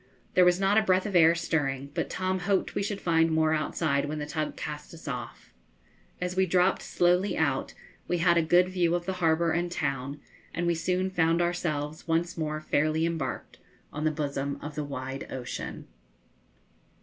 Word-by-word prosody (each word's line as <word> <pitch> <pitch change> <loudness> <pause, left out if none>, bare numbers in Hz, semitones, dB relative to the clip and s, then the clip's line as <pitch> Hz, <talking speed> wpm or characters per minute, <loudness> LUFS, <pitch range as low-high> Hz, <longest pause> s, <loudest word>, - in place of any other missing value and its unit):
There 180 - +6
was 180 0 +4
not 195 +2 +4
a - - +2
breath 185 -3 +2
of 205 -3 -3
air 165 -1 +6
stirring, 140 -5 -1
but - - -2
Tom 185 0 -1
hoped 190 +1 0
we - - -1
should 200 0 -2
find 165 -1 +3
more 160 0 +2
outside 155 -2 0
when 150 +1 -4
the 150 - -3
tug 155 +1 -3
cast 150 +2 -6
us 160 - -13
off. 125 -3 -6 0.7
As 180 0 -3
we 190 0 +3
dropped 180 +2 +3
slowly 180 +3 +2
out, - - 0 0.3
we 175 - 0
had 170 0 +4
a 170 - +4
good 175 +3 +4
view 175 -2 +1
of 175 0 -3
the 190 - -1
harbour 165 0 +3
and 175 +1 -1
town; 140 -3 -2 0.4
and 175 - -1
we 170 - +3
soon 185 +3 -1
found 165 -1 +2
ourselves 155 -4 -2
once 165 +1 0
more 155 -2 -2
fairly 155 +1 +1
embarked 165 -1 -4 0.3
on 150 - -4
the 155 - +3
bosom 140 -2 -2
of 150 +1 -7
the 150 +1 -3
wide 135 -1 -5
ocean. 125 -2 -6
165 Hz, 185 wpm, -28 LUFS, 150-180 Hz, 0.7 s, There